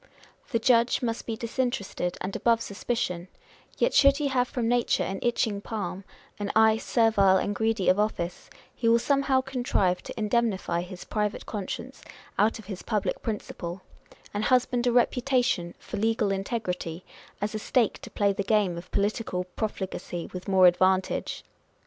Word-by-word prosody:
The 250 - +1
judge 235 +1 +3
must 230 -1 -2
be 225 - -2
disinterested 230 -7 -2
and 190 +1 -4
above 230 -1 +3
suspicion; 200 -5 -3 0.5
yet - - +2
should 275 0 +6
he 290 -2 0
have 250 -2 +1
from 240 -3 -2
nature 240 0 +2
an 195 0 -3
itching 225 -4 0
palm, 200 -4 -5 0.3
an 205 0 -2
eye 220 0 +6
servile 220 -5 +3
and 205 - -1
greedy 220 -2 0
of 185 +2 +4
office, 180 -5 -2 0.2
he 230 - 0
will 230 - +6
somehow 275 +1 +2
contrive 245 -9 0
to - - -8
indemnify 210 -5 0
his 180 0 -8
private 210 -1 -2
conscience 205 -4 -5 0.4
out 215 +2 +3
of 220 - -12
his 190 -2 -6
public 210 -3 -1
principle, 190 -4 -5 0.5
and 210 +1 -1
husband 250 -1 +2
a - - +4
reputation 245 -7 +1
for - - -7
legal 220 -1 +1
integrity, 190 -4 -3 0.3
as 210 +1 -2
a 215 - -2
stake 230 0 +1
to - - -10
play 200 -1 +1
the 195 - -2
game 200 -4 +1
of 180 - -13
political 200 -2 -1
profligacy 185 -2 -5
with 180 0 -7
more 190 -2 +5
advantage 185 +1 +2
215 Hz, 160 wpm, -27 LUFS, 190-235 Hz, 0.5 s, should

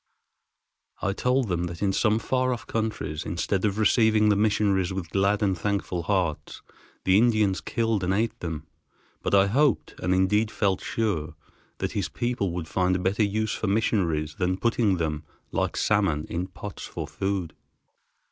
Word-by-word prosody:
I 100 - +1
told 125 +3 +1
them 90 -2 -1
that 85 +2 -5
in 95 -1 +2
some 110 +1 +2
far 130 +3 0
off 120 - -6
countries, 110 -9 -3
instead 95 +2 -1
of 105 -1 0
receiving 110 -1 +4
the 105 - +4
missionaries 100 -3 +2
with 95 -3 -5
glad 100 +2 +2
and 95 -2 +2
thankful 95 -1 -2
hearts, 90 -4 -2 0.4
the 95 +2 +5
Indians 110 -5 +2
killed 115 -4 0
and 90 - +1
ate 110 +4 0
them; 80 -3 -5 0.6
but - - +1
I 95 0 +6
hoped, 135 +8 +2
and 90 - -1
indeed 100 +4 +3
felt 100 -4 0
sure, 100 -9 -2 0.4
that - - -2
his - - -2
people 120 -6 -1
would 85 -2 -4
find 90 +1 +1
a - - +2
better 95 +4 0
use 110 +1 0
for 110 - -3
missionaries 90 -8 +1
than 90 0 +1
putting 115 -3 +2
them, 75 -2 -2 0.3
like - - -1
salmon, 95 -8 +1
in 90 +2 -2
pots 100 +2 -8
for - - -5
food. 95 -5 -2
100 Hz, 165 wpm, -26 LUFS, 90-110 Hz, 0.6 s, I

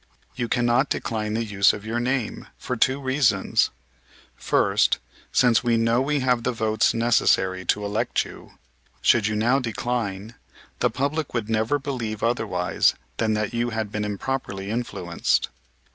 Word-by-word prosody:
You 120 - -2
cannot 120 +3 +2
decline 110 -2 -2
the 115 0 -1
use 100 -1 +3
of 105 0 -7
your 115 +2 -2
name, 125 -1 -2
for 125 - -4
two 130 +4 +2
reasons; 135 -1 +2 0.7
first, - - +2 0.3
since 120 -2 +4
we 120 -1 +2
know 115 +2 +2
we 145 +1 0
have 125 -2 +2
the 125 - 0
votes 110 -1 +1
necessary 95 -5 +2
to 105 +4 0
elect 105 +2 0
you, - - -13 0.5
should 110 -4 +4
you 110 - -1
now 120 +6 +2
decline 115 -3 -3 0.5
the - - +3
public 140 +1 -2
would 115 -2 -2
never 110 +6 +1
believe 120 -7 -4
otherwise 110 -7 +1 0.2
than 110 -1 +1
that 105 +2 -2
you 120 0 0
had 110 -2 -3
been 105 0 -2
improperly 105 -2 -3
influenced. 110 -7 -1
115 Hz, 150 wpm, -24 LUFS, 105-125 Hz, 0.7 s, since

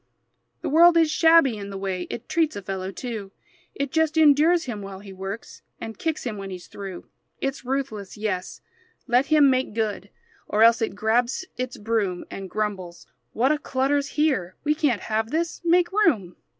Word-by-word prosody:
The - - -1
world 335 +3 +6
is 325 -2 +4
shabby 325 -7 +5
in 200 0 -7
the 195 - -6
way 190 -2 -3
It 235 - -6
treats 320 -2 +1
a 200 - -6
fellow 190 -1 -4
too; 220 -3 -6 0.4
It 280 -1 -3
just 320 0 +1
endures 315 +3 +5
him 235 -7 -5
while 195 -1 -7
he 200 -1 -11
works, 195 +3 -7 0.2
And 225 - -6
kicks 320 -2 -2
him 225 -4 -4
when 195 -1 -6
he's 180 -2 -8
through. 195 -3 -8 0.3
It's 275 -1 -3
ruthless, 255 -7 -4
yes; 205 -4 -3 0.4
let 250 +3 +2
him 305 -2 +5
make 255 -4 -1
good, 210 -3 -2 0.4
Or 215 +1 +3
else 230 0 +6
it 220 - -1
grabs 235 - +1
its 255 0 -4
broom 205 -4 -1
And 195 -1 -7
grumbles: 190 -7 -4 0.3
"What 255 +6 +2
a 305 - +1
clutter's 275 +1 0
here! 260 - +1
We 300 +1 +2
can't 295 -8 0
have 220 0 -1
this. 330 +4 -2
Make 345 +1 +3
room!" 275 - +2
235 Hz, 180 wpm, -24 LUFS, 200-300 Hz, 0.4 s, world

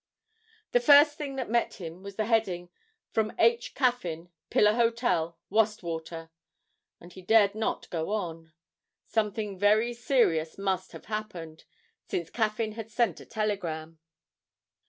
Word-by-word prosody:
The 245 - +4
first 290 +3 +7
thing 285 -3 -5
that 260 -2 -3
met 235 +2 0
him 170 -1 -8
was 200 0 -9
the 215 - -1
heading: 195 -6 0 0.4
From 220 -1 0
H. 235 +1 +2
Caffyn, 180 - -1 0.2
Pillar 210 0 +4
Hotel, 230 -8 +1
Wastwater, 170 -6 -1 0.7
and 175 +1 -14
he 190 - -11
dared 205 +1 +4
not 220 +1 -2
go 160 0 -2
on. 165 -6 -4 0.5
Something 210 -3 -2
very 215 +4 +3
serious 225 - +1
must 190 -1 -2
have - - -10
happened, 180 -7 -6 0.4
since 170 -2 -3
Caffyn 220 -1 0
had 225 0 -7
sent 220 -6 0
a - - -13
telegram! 170 -8 -3
210 Hz, 135 wpm, -28 LUFS, 170-230 Hz, 0.7 s, first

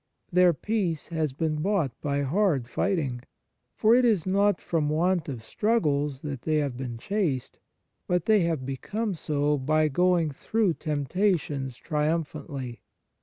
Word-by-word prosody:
Their 180 0 +5
peace 180 -2 -2
has 160 -4 -1
been 155 +3 -1
bought 170 - +1
by 140 -1 0
hard 150 - +1
fighting. 140 -6 -1 0.5
For 220 +1 +4
it 250 +1 +5
is 215 -9 +3
not 200 +2 +2
from 155 -3 -1
want 170 +2 +1
of 120 -5 -6
struggles 145 - 0
that 140 -5 -4
they 155 +3 0
have 145 -4 0
been 125 -2 -5
chaste; 160 - -2 0.5
but 180 -2 +1
they 215 -1 +5
have 165 -7 0
become 205 - -3
so 150 -3 0
by 155 +3 +2
going 175 +1 +2
through 205 +6 0
temptations 150 -3 -1
triumphantly. 150 -5 -3
155 Hz, 140 wpm, -27 LUFS, 140-185 Hz, 0.5 s, Their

